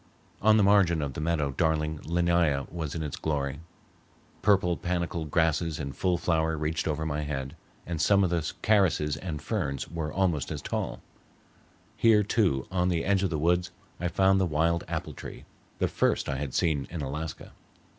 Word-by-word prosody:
On 110 +1 +5
the 105 - +4
margin 100 -5 +4
of 70 -2 -3
the 75 - -5
meadow 75 -3 0
darling 80 0 0
linnæa 85 -4 +1
was 80 -3 -4
in 80 - -2
its 75 - -4
glory; 70 -2 -2 0.8
purple 95 -4 +3
panicled 85 -3 -2
grasses 80 0 +1
in 70 -2 -4
full 90 +5 0
flower 80 -2 0
reached 75 +1 -2
over 80 0 -1
my 75 -1 -2
head, 70 -2 -4 0.3
and 85 -3 -3
some 100 +5 +4
of 90 - +1
the 85 -2 -1
carices 90 -8 +3
and 80 -4 -5
ferns 75 - -2
were 80 -2 -3
almost 85 -6 0
as - - -3
tall. - - -3 0.9
Here, 110 -2 +5
too, 95 - +1
on 90 -1 +1
the 85 -2 0
edge 100 -1 +2
of 95 - +1
the 80 - -1
woods 90 +3 +1 0.3
I 85 - -1
found 95 +1 +3
the 95 - +2
wild 85 +2 +1
apple - - -4
tree, - - -9 0.3
the - - +1
first - - +1
I 70 - -2
had 70 -2 -4
seen 75 -5 +1
in 85 -3 -4
Alaska. 75 +3 -5
80 Hz, 180 wpm, -28 LUFS, 75-90 Hz, 0.9 s, On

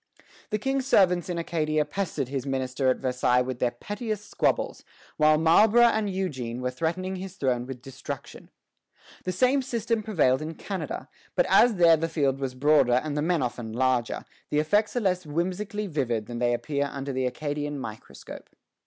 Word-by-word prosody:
The 210 - 0
King's 270 +4 -1
servants 180 -7 +3
in 175 - -2
Acadia 155 -2 0
pestered 190 -9 -3
his 135 -1 -3
minister 130 0 -1
at 130 - +2
Versailles 125 -1 +1
with 125 -1 -5
their 125 - +2
pettiest 210 - -5
squabbles, - - 0 0.3
while 155 0 +5
Marlborough 205 +9 +5
and 220 -3 +3
Eugene 130 -11 -3
were 125 0 -2
threatening 185 +7 -2
his 190 0 -7
throne 125 -5 -1
with 130 -2 -8
destruction. 135 -1 -8 0.8
The 185 - 0
same 255 +9 +3
system 235 -3 -1
prevailed 155 -12 +2
in 160 +1 -5
Canada; 195 -2 -5 0.3
but - - +3
as 240 -2 +5
there 170 -3 +6
the 165 +1 -2
field 140 -4 0
was 130 -2 -3
broader 140 -2 +4
and 145 +4 0
the 150 - 0
men 165 -2 +1
often 120 -2 -4
larger, 125 -1 0 0.2
the 150 - 0
effects 205 +10 +2
are 245 - +1
less 185 -3 +1
whimsically 185 +7 -2
vivid 125 - -1
than 120 +1 -6
they 120 0 +2
appear 140 +2 -2
under 140 0 -4
the 130 0 0
Acadian 145 +2 -3
microscope. 110 -4 -9
155 Hz, 175 wpm, -26 LUFS, 130-190 Hz, 0.8 s, there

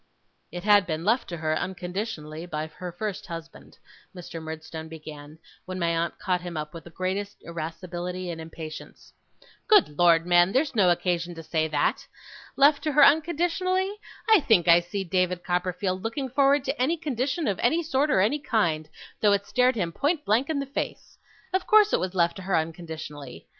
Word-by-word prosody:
'It 175 +1 -6
had 205 -2 +5
been 160 0 -3
left 230 +5 +1
to 170 - -5
her, 155 0 -1
unconditionally, 175 -3 -5
by 155 -2 -3
her 175 +3 -8
first 200 +3 -5
husband,' 165 -1 -10 0.4
Mr. 170 -2 -8
Murdstone 160 0 -7
began, 155 -1 -10 0.3
when 185 0 -5
my 170 -2 0
aunt 165 +1 -2
caught 180 -3 -1
him 175 -2 -6
up 150 0 -5
with 165 -2 -10
the - - -10
greatest 190 +4 -3
irascibility 175 +2 -5
and 165 -1 -6
impatience. 160 -1 -10 0.5
'Good 405 - +4
Lord, 170 -1 +5
man, 175 +2 +4
there's 280 +2 +1
no 200 -6 +4
occasion 175 0 0
to 165 - -8
say 160 0 0
that. 150 -2 0 0.5
Left 285 +1 +5
to 305 -2 -1
her 295 - +8
unconditionally! 350 +5 +1 0.3
I 440 -2 +7
think 220 - +3
I 170 0 +8
see 195 +3 -4
David 180 0 0
Copperfield 180 +1 -1
looking 245 +5 -3
forward 275 +1 +3
to 270 -1 -3
any 315 +7 +2
condition 285 +1 -2
of 200 -3 -1
any 320 +8 +2
sort 295 -1 +1
or 190 -6 +4
kind, 165 - 0 0.3
though 210 -1 +4
it 200 0 0
stared 250 +3 +2
him 175 -6 -1
point 295 - -1
blank 230 +8 +2
in 315 - 0
the 280 - -2
face! 275 - -5 0.3
Of 375 - 0
course 430 -3 +5
it - - +3
was 185 0 -3
left 170 -1 +2
to - - -7
her 190 -1 -1
unconditionally. 160 -4 -6
180 Hz, 185 wpm, -26 LUFS, 165-255 Hz, 0.5 s, her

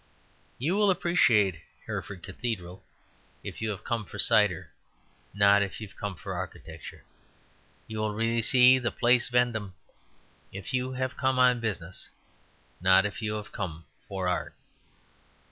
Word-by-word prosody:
You 150 +9 0
will 205 -1 +4
appreciate 120 - +3 0.3
Hereford 90 -3 -6
Cathedral 95 -3 -5 0.6
if - - -7
you 110 - -1
have 105 -1 -5
come 115 -2 -2
for - - -10
cider, - - +3 0.6
not 100 0 +5
if 100 -1 -3
you 110 - -6
have - - -19
come 100 -2 -4
for 80 - -6
architecture. - - -8 0.8
You 110 -1 -6
will 105 -1 -1
really 115 +1 +1
see 125 +2 +6
the 120 -1 -1
Place 120 +1 +2
Vendome 115 -6 0 0.8
if 100 +6 -7
you 130 0 -1
have 130 0 -3
come 130 0 +1
on 125 -1 +5
business, 95 -6 -4 0.7
not 95 +2 +5
if 105 - -4
you 105 -1 -1
have 105 -1 -6
come 85 -4 -5 0.2
for 95 -2 -3
art. 90 - -2
110 Hz, 145 wpm, -28 LUFS, 95-125 Hz, 0.8 s, see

